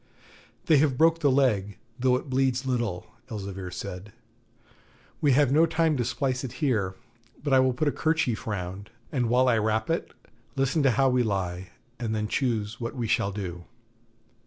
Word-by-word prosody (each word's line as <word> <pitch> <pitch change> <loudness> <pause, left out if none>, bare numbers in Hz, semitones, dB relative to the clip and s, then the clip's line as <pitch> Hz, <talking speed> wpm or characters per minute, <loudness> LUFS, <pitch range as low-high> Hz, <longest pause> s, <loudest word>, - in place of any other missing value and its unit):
'They 155 - +5
have 140 -3 +2
broke 165 +2 +4
the 145 -3 +3
leg, 110 -7 +1 0.2
though 125 0 +3
it 130 - -4
bleeds 130 0 +1
little,' 120 -8 -1 0.2
Elzevir 95 -4 -5
said. 90 +2 -7 1.1
'We 145 -4 +4
have 140 -1 +4
no 160 +4 +5
time 160 -1 +1
to 125 - 0
splice 130 +2 -1
it 125 - -5
here, 110 - 0 0.5
but 145 -2 0
I 130 - +7
will 130 0 +4
put 155 +5 -1
a - - +3
kerchief 155 -10 0
round, 100 0 -4 0.2
and 125 -5 0
while 125 +2 +4
I 115 -3 +3
wrap 110 +4 0
it, 165 - -2 0.4
listen 135 +3 +1
to 135 - +4
how 135 -1 +4
we 125 -1 +3
lie, 95 -4 -2 0.3
and 110 -3 -2
then 105 0 -1
choose 110 -2 -1
what 115 - -4
we 120 -3 -2
shall 100 -2 +1
do.' 90 -4 -6
125 Hz, 180 wpm, -27 LUFS, 105-135 Hz, 1.1 s, I